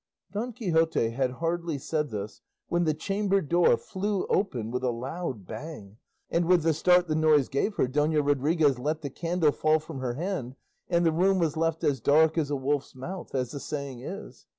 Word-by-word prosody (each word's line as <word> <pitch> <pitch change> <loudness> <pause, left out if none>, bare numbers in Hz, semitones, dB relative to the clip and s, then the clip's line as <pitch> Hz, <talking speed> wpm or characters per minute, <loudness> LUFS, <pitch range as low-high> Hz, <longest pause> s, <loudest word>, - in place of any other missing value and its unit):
Don 225 +5 -3
Quixote 165 - +1
had 130 +2 0
hardly 165 +1 -2
said 150 +2 -2
this, 105 0 -6 0.3
when 175 0 +1
the 155 - +2
chamber 195 +4 0
door 170 -5 +3
flew 195 - -2
open 125 - 0
with 125 +1 -2
a 125 - +2
loud 130 - -4
bang, 110 - -8 0.3
and 170 0 +2
with 175 -1 +4
the 165 0 +3
start 180 +3 +4
the 155 - 0
noise 155 -3 +3
gave 170 +10 0
her - - +2
Dona 150 +3 +1
Rodriguez 145 0 +2
let 155 +4 -2
the 140 -3 -5
candle 165 0 +1
fall 155 +2 +2
from 155 -2 -8
her 125 -2 -2
hand, 150 -6 -3 0.3
and 170 0 +2
the 165 - +4
room 190 +4 +3
was 165 -4 +1
left 165 0 0
as 135 -3 +1
dark 155 +5 +4
as 155 -4 0
a 145 - 0
wolf's 140 +1 -2
mouth, 170 +5 -7
as 125 -2 -1
the 140 - -5
saying 140 -4 -5
is. 195 +10 -8
155 Hz, 195 wpm, -27 LUFS, 135-175 Hz, 0.3 s, with